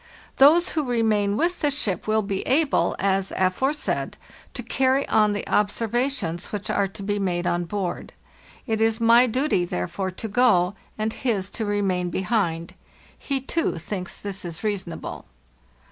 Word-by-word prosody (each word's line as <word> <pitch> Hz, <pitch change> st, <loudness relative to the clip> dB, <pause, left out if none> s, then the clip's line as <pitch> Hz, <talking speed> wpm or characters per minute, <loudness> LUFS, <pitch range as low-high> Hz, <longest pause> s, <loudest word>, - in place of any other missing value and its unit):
Those 320 Hz, +6 st, +6 dB
who 310 Hz, -, -1 dB
remain 220 Hz, -5 st, +1 dB
with 350 Hz, +3 st, 0 dB
the 295 Hz, -, +2 dB
ship 215 Hz, -, -2 dB
will 215 Hz, 0 st, +2 dB
be 195 Hz, -1 st, -2 dB
able, 285 Hz, +2 st, +2 dB
as 195 Hz, 0 st, 0 dB
aforesaid, 265 Hz, +11 st, 0 dB, 0.4 s
to 245 Hz, -, -4 dB
carry 265 Hz, +3 st, +1 dB
on 210 Hz, -1 st, +4 dB
the 205 Hz, -, -4 dB
observations 215 Hz, -3 st, 0 dB
which 205 Hz, -2 st, -4 dB
are 200 Hz, -1 st, +1 dB
to 195 Hz, +1 st, -10 dB
be 205 Hz, +1 st, -1 dB
made 175 Hz, -3 st, -1 dB
on 175 Hz, 0 st, 0 dB
board. 190 Hz, -1 st, -4 dB, 0.5 s
It 220 Hz, -3 st, -1 dB
is 225 Hz, 0 st, +2 dB
my 235 Hz, +2 st, +6 dB
duty 250 Hz, -5 st, +1 dB
therefore, 175 Hz, -, -3 dB
to 185 Hz, +4 st, -6 dB
go, 205 Hz, -5 st, +3 dB, 0.2 s
and 220 Hz, +1 st, -1 dB
his 205 Hz, -7 st, -1 dB
to 220 Hz, -, -3 dB
remain 195 Hz, -3 st, 0 dB
behind. 175 Hz, -3 st, -1 dB, 0.4 s
He, 275 Hz, -2 st, -3 dB
too, 325 Hz, -, -1 dB
thinks 180 Hz, +2 st, -5 dB
this 185 Hz, -4 st, -6 dB
reasonable. 190 Hz, -6 st, -4 dB
205 Hz, 150 wpm, -24 LUFS, 185-245 Hz, 0.5 s, Those